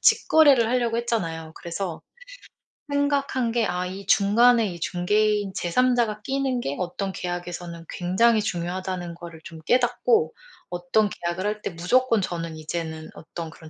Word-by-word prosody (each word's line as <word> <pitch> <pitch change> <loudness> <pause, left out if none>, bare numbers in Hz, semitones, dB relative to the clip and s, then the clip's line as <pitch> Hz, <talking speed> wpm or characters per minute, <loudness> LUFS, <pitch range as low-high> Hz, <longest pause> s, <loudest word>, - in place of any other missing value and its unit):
직거래를 280 -7 +5
하려고 235 -1 +1
했잖아요. 165 -10 -2
그래서 170 0 -5 0.9
생각한 280 -4 +1
게 230 -1 +1
아 180 0 -2
이 190 +1 -7
중간에 230 +4 +5
이 175 -4 -5
중개인 205 +4 +1
제 175 - -3
3 250 +8 +3
자가 220 -3 0
끼는 270 -2 -1
게 140 -10 -3
어떤 185 +2 -3
계약에서는 175 -2 -5
굉장히 215 +6 +2
중요하다는 180 -1 -3
거를 170 -1 -11
좀 165 -1 -10
깨닫고 255 - +2 0.4
어떤 180 +5 +1
계약을 175 +1 -4
할 210 0 -2
때 - - -3
무조건 225 +8 +2
저는 165 -3 -4
이제는 160 0 -5
어떤 165 0 -8
그런 160 -1 -13
190 Hz, 320 characters per minute, -25 LUFS, 170-235 Hz, 0.9 s, 직거래를